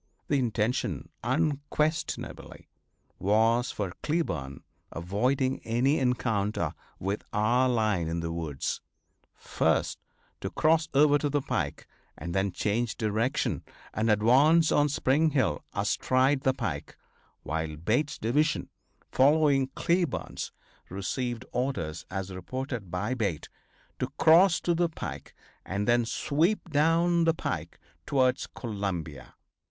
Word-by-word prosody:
The 145 - +3
intention 120 0 -1
unquestionably 150 +4 -2 0.5
was 115 +5 +3
for 95 -4 -3
Cleburne, 80 - -2 0.3
avoiding 125 +10 0
any 125 +6 +2
encounter 110 - 0 0.2
with 100 +3 -2
our 120 +5 +2
line 110 -8 +1
in 85 +1 -2
the 85 0 -3
woods, 80 -5 -3 0.5
first - - 0 0.4
to - - -4
cross 160 +1 +2
over 145 +1 +5
to 145 - 0
the 145 -1 0
pike 75 - -3 0.3
and 85 0 -5
then 95 +1 +1
change 110 +5 -1
direction 110 +3 0 0.3
and 110 +1 0
advance 135 +10 +5
on 145 0 +3
Spring 145 +3 +2
Hill 130 - 0
astride 130 +2 +1
the 130 - +2
pike, - - -4 0.5
while 80 0 -3
Bate's 120 - 0
division, 145 +8 0 0.4
following 140 -1 +4
Cleburne's, 170 -3 -1 0.4
received 120 +6 -3
orders 85 - -3
as 95 0 -4
reported 120 +2 -5
by 95 +8 -2
Bate, 100 -11 -2 0.5
to 130 - 0
cross 175 +3 +6
to 175 - +1
the 170 0 +1
pike 160 - -7 0.3
and 100 +2 -3
then 120 0 +3
sweep 165 - 0
down 165 +3 +3
the 165 0 +3
pike - - -4 0.3
towards 130 -1 +2
Columbia. 90 - -5
125 Hz, 115 wpm, -28 LUFS, 100-145 Hz, 0.5 s, cross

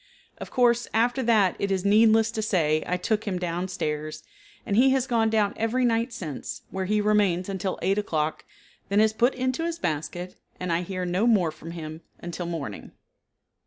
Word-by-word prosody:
Of - - -7
course, 240 -2 +3
after 245 +4 +2
that 215 -6 +3
it 200 - -1
is 190 -1 -1
needless 220 +2 +5
to 220 - -3
say 160 -7 +1
I 180 - 0
took 215 +4 -1
him 185 -3 -1
down 175 +1 -2
stairs, 155 -4 -4 0.4
and 200 - -1
he 255 +5 +6
has 265 -2 +1
gone 230 -4 +2
down 215 -2 +2
every 235 +3 +1
night 230 +1 +1
since, 165 - -6
where 190 0 -2
he 210 +2 +1
remains 205 -4 +2
until 190 -1 -3
8 195 +3 +2
o'clock, 155 -6 -2 0.5
then 200 +1 +3
is 220 0 +4
put 240 +4 +2
into 255 +4 -1
his 335 0 -2
basket, 175 - -4 0.2
and 180 -2 -1
I 165 - +1
hear 185 0 -4
no 185 +6 +1
more 190 -9 +3
from 155 +1 -11
him 160 -1 -7 0.2
until 175 0 -5
morning. 145 -12 -6
200 Hz, 190 wpm, -26 LUFS, 175-225 Hz, 0.5 s, he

